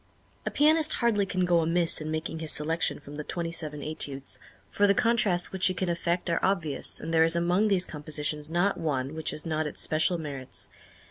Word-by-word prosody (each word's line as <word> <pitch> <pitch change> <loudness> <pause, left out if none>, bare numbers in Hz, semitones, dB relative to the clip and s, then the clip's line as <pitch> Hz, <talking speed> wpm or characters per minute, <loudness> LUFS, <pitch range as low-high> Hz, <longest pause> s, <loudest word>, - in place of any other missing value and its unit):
A - - +2
pianist 310 +1 +4
hardly 210 -5 +1
can 185 -1 0
go 175 -1 +3
amiss 165 0 +3
in 155 - -5
making 160 +1 -4
his 160 -1 0
selection 160 +2 0
from 145 0 -11
the 150 - -4
twenty 170 +1 -4
seven 150 -3 -2
Études, 140 -3 -2 0.3
for 205 - +2
the 200 - +3
contrasts 220 -7 +2
which 190 -1 +1
he 185 - -1
can 185 0 -2
effect 170 +1 -2
are 170 -1 +1
obvious, 170 -7 +2
and 165 - -5
there 160 - +4
is 165 +1 +4
among 175 +5 +2
these 190 -3 +3
compositions 150 0 -3
not 175 +4 0
one 140 -3 -2
which 160 0 -2
has 150 - -5
not 155 -1 -1
its - - -7
special 160 +3 +1
merits. 140 -5 -7
165 Hz, 205 wpm, -27 LUFS, 155-185 Hz, 0.3 s, pianist